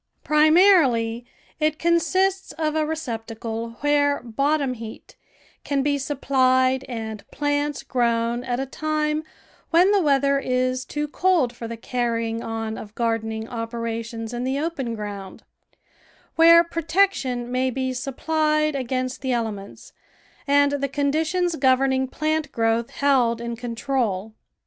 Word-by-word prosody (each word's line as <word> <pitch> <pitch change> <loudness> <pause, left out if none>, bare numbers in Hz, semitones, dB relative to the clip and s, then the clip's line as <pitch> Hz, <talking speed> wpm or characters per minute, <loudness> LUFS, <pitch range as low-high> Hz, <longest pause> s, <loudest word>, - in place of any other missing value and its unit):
Primarily, 300 - +4 0.3
it 310 0 +1
consists 370 +3 +1
of 310 -1 -2
a 310 -1 +1
receptacle 230 -5 -5
where 290 0 +2
bot 275 +6 0
tom 270 -3 -1
heat 225 -2 -10 0.5
can 280 -2 0
be 285 0 +1
supplied 260 -2 +2
and 220 -3 -5
plants 290 0 -1
grown 235 -1 0
at 245 -1 -2
a 270 - -1
time 305 +2 -1 0.5
when 355 +4 +5
the 405 -2 +4
weather 280 -2 +3
is 255 -1 -1
too 295 0 -3
cold 320 -6 +1
for 230 - -6
the 230 0 -6
carrying 230 -1 -2
on 225 -1 -4
of 210 0 -11
gardening 225 -1 -2
operations 230 0 -5
in 240 +1 -3
the 265 +2 -1
open 280 -7 -3
ground; 205 -2 -7 0.9
where 335 +1 +8
protection 325 -8 0
may 255 +1 +1
be 260 0 -2
supplied 305 +4 0
against 255 0 -2
the 260 -2 -1
ele 230 -2 0
ments 200 -1 -11 0.5
and 285 0 +4
the 280 - 0
conditions 315 +5 0
governing 265 0 +2
plant 310 +3 -2
growth 225 0 0
held 255 -5 +2
in 235 0 -4
control. 230 -4 -2
260 Hz, 130 wpm, -23 LUFS, 230-300 Hz, 0.9 s, where